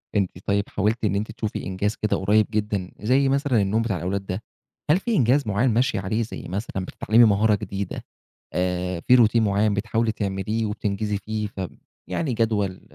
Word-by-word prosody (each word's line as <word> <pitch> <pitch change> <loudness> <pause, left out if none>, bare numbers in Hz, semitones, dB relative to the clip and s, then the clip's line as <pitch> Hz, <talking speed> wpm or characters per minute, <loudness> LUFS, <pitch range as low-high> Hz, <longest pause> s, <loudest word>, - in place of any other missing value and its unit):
أنتِ 100 -3 +2
طيب 100 0 0
حاولتِ 110 +3 0
إن 100 - +1
أنتِ 105 +2 -2
تشوفي 110 -2 -4
إنجاز 100 +3 -2
كده 105 - 0
قريب 105 +3 +3
جدًا، 105 -4 -2
زي 135 +5 +3
مثلًا 135 -5 +2
النوم 105 +4 +1
بتاع 115 -5 -1
الأولاد 95 +3 -3
ده، 95 +3 -4 0.5
هل 175 - +4
في 235 +2 -1
إنجاز 135 - +3
معيّن 105 +6 +2
ماشية 120 -1 +1
عليه، 110 +4 -1
زي 110 - -7
مثلًا 95 0 -4
بتتعلّمي 115 +5 +3
مهارة 105 0 +4
جديدة، 100 -1 -5 0.5
آآ، 90 -1 -1
في 125 +8 +5
routine 115 -1 +4
معيّن 100 0 +2
بتحاولي 110 +2 0
تعمليه 105 +2 -2
وبتنجزي 105 0 -2
فيه 110 0 -3
ف 95 - -9 0.5
يعني، 140 -7 -1
جدول 105 -4 0
105 Hz, 175 wpm, -24 LUFS, 100-115 Hz, 0.5 s, في